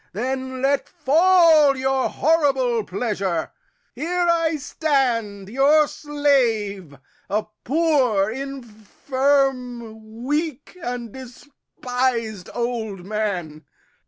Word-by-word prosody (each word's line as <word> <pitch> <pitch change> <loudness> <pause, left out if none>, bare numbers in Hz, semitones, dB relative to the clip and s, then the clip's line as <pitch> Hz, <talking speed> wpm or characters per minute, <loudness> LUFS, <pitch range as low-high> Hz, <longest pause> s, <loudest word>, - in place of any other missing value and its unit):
Then 260 +4 -3
let 280 +1 +1
fall 325 -2 +4
Your 265 0 0
horrible 270 -7 +1
pleasure. 195 -5 -2 0.4
Here 350 +3 -1
I 330 -1 +2
stand 250 -9 -1
your 285 +7 +4
slave, 230 - 0 0.3
A 210 +2 0 0.2
poor, 260 -9 +2
infirm, 250 -2 -2
weak, 295 +2 -2
and 245 -5 -5
despis'd 250 -5 -4
old 225 -6 -3
man. 185 -7 -3
255 Hz, 80 wpm, -22 LUFS, 220-285 Hz, 0.4 s, fall